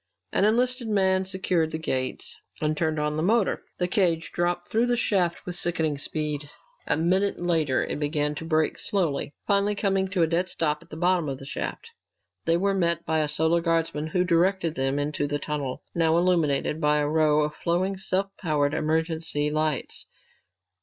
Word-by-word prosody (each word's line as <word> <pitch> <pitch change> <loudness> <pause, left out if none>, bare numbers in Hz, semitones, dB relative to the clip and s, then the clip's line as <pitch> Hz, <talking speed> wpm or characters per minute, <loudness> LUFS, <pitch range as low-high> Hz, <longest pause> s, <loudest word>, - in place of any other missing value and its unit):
An - - +3
enlisted 245 +2 +1
man 190 -3 +2
secured 185 -4 0
the 160 - -3
gates 130 -5 -3 0.2
and 155 0 0
turned 155 0 0
on 150 0 -1
the - - 0
motor. 205 +4 +2 0.2
The 180 - 0
cage 175 -3 +1
dropped 175 0 -1
through 230 +2 +1
the 245 0 +1
shaft 185 -7 0
with 180 - -4
sickening 160 -5 -1
speed. 150 -1 -3 0.4
A - - +2
minute 185 +5 +1
later 160 -6 +1
it - - -4
began 150 0 0
to 150 - -6
brake 155 -1 +1
slowly, 165 -8 -1
finally 200 +1 +2
coming 195 -2 +1
to 185 -3 +1
a - - +3
dead 175 +3 0
stop 150 -4 -1
at - - -19
the 155 - -8
bottom 175 -2 +2
of 135 - -4
the 135 - -11
shaft. 460 - -5 0.5
They 165 0 +3
were 195 +2 +1
met 170 -3 0
by 160 0 +1
a 155 - +1
Solar 160 +3 +2
Guardsman 165 -2 0
who 180 +3 +1
directed 175 -1 +2
them 135 -1 0
into 145 0 -1
the 145 0 -1
tunnel, 145 -3 -4
now 165 -1 +3
illuminated 160 -4 +1
by 150 -1 +3
a 145 0 +1
row 155 -1 +3
of 150 0 -2
flowing, 180 +5 0
self 190 +1 -1
powered 150 -5 +1
emergency 160 -1 0
lights. 155 -2 -2
165 Hz, 185 wpm, -26 LUFS, 150-185 Hz, 0.5 s, An